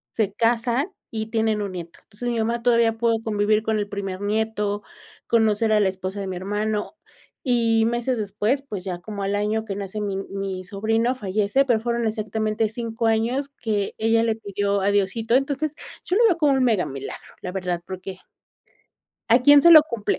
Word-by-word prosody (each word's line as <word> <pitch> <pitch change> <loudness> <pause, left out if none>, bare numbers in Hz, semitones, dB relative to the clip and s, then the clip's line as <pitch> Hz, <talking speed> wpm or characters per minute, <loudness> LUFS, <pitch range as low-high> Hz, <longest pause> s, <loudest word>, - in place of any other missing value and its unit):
se 210 -3 +1
casan 235 - +1 0.2
y 220 -1 -3
tienen 220 -2 +1
un 200 - -4
nieto. 170 -1 -8
Entonces, 230 +3 -6
mi 235 - -1
mamá 230 +1 -1
todavía 230 -2 +3
pudo 230 -1 +2
convivir 210 0 +1
con 220 -1 0
el 205 - -2
primer 195 -1 -5
nieto, 210 -1 -1 0.4
conocer 220 -1 +2
a 215 - +4
la 200 -2 +3
esposa 190 +1 -5
de 195 - -4
mi 190 - -4
hermano, 210 - -2 0.5
y 230 -3 +2
meses 240 +1 -1
después, 210 +6 0
pues, 210 -9 -6
ya 180 -2 -4
como 200 +1 -6
al 200 +1 0
año 210 +2 -1
que 200 -3 -4
nace 200 +1 -5
mi 200 -2 -2
mi 195 -1 -4
sobrino 225 +5 0
fallece, 210 +4 +1
pero 240 -4 +2
fueron 235 +1 -1
exactamente 215 0 -1
5 230 0 -2
años 235 +6 0
que 215 -7 -3
ella 225 +1 +2
le 225 -1 +1
pidió 200 -2 -1
a 200 +1 +2
Diosito. 205 +3 0
Entonces, 280 +3 0 0.3
yo 360 - 0
lo 470 - +5
veo 350 -5 +2
con 300 -3 +3
un 260 - +2
mega 220 -7 +2
milagro, 135 0 -8
la 180 - -5
verdad, 180 -2 -3
porque. 185 0 -7 1.1
¿A 235 - +8
quién 290 +2 +7
se 340 - +7
lo 310 -2 +10
cumple? 235 -9 -2
220 Hz, 190 wpm, -23 LUFS, 200-235 Hz, 1.1 s, lo